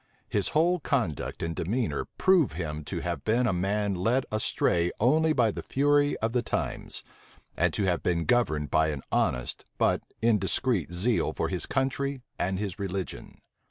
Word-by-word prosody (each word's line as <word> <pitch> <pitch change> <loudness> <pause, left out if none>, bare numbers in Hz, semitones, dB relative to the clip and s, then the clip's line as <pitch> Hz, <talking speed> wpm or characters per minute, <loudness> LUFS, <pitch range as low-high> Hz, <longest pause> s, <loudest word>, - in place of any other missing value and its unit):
His 100 -2 +2
whole 175 +3 +3
conduct 115 - -2
and 85 0 -2
demeanor 115 +8 -1
prove 185 - +4
him 75 -2 -4
to - - -4
have 85 -5 -3
been 120 +3 +2
a 115 - +2
man 100 +3 0
led 115 +9 +1
astray 90 -5 +1
only 155 +7 +3
by 120 -7 +3
the - - -6
fury 145 +1 +2
of 110 +1 -1
the 125 - +2
times, 110 - -3 0.5
and - - +2
to - - +1
have 90 -2 +1
been 85 -2 0
governed 80 -12 +1
by 80 0 +3
an 75 -3 -4
honest 60 0 0
but - - +2 0.2
indiscreet 105 - +2
zeal 105 +7 +1
for - - -2
his - - -2
country 135 0 -1 0.2
and 95 +1 0
his 100 -1 -4
religion. 95 -1 -5
105 Hz, 165 wpm, -28 LUFS, 90-130 Hz, 0.5 s, prove